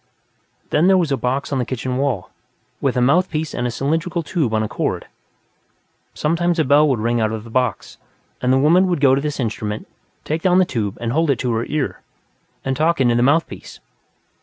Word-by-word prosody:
Then, 155 +4 +3
there 190 0 +5
was 170 -5 0
a - - +3
box 135 +3 -2
on 135 - 0
the - - +1
kitchen 130 0 -3
wall, 130 -9 -2 0.5
with - - 0
a - - +2
mouthpiece 155 +3 +1
and 120 0 -1
a - - -1
cylindrical 165 +7 -1
tube 150 -6 -1
on 110 0 +1
a - - -2
cord. - - -3 1.1
Sometimes 170 +2 0
a 160 - +3
bell 145 +2 +4
would 130 - +1
ring 115 +2 0
out 110 -1 +1
of 110 -1 -5
the 115 - -12
box, 125 -4 -2 0.4
and 125 - +1
the 130 - +4
woman 170 +7 +4
would 175 -4 0
go 135 -2 +5
to 135 - +2
this 150 0 -3
instrument, 110 -3 -3 0.4
take 155 +2 -2
down 180 0 +3
the 185 - +5
tube 105 - -3
and 115 -1 -2
hold 160 +4 +1
it 140 - +2
to 125 - -1
her 115 +1 -1
ear, 150 -2 -2 0.6
and 135 0 0
talk 160 +3 +1
into 120 -3 +3
the 120 - +2
mouthpiece. 145 +6 0
135 Hz, 210 wpm, -20 LUFS, 120-160 Hz, 1.1 s, there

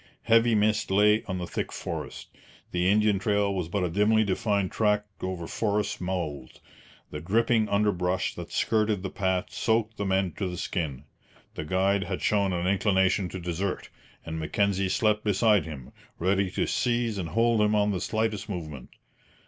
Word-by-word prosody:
Heavy 115 0 +4
mist 105 0 +1
lay 105 +3 +4
on 95 - -3
the 90 - -3
thick - - -4
forest. - - -6 0.4
The 90 +1 +1
Indian 105 -1 +3
trail 100 0 +1
was 90 -4 -3
but 100 +1 -1
a 90 - 0
dimly 105 +4 +3
defined 100 -1 0
track 105 -1 +1 0.2
over 95 -2 -4
forest 105 +2 -1
mould. 85 -8 -4 0.5
The 75 - -5
dripping 110 +5 +1
underbrush 95 -3 0
that - - -8
skirted 105 -3 +1
the 95 - -4
path 95 -2 -1
soaked 110 -1 0
the 100 - -2
men 95 -1 +1
to 95 - -1
the 90 -1 -5
skin. 80 -8 -3 0.5
The 75 - -5
guide 95 +3 +1
had 95 -1 -4
shown 100 -2 +2
an 90 -1 -2
inclination 95 -1 +2
to 95 - -6
desert, 90 +2 -3 0.3
and 80 0 -4
Mackenzie 95 +4 0
slept 105 +1 +1
beside 105 0 +3
him, 70 -6 -9 0.3
ready 95 +2 +1
to - - -1
seize 120 -4 0
and 85 -3 -4
hold 115 +2 +2
him 105 0 +3
on 105 0 +2
the 90 -3 -2
slightest 110 -1 -2
movement. 75 -9 -6
100 Hz, 170 wpm, -27 LUFS, 90-105 Hz, 0.5 s, Heavy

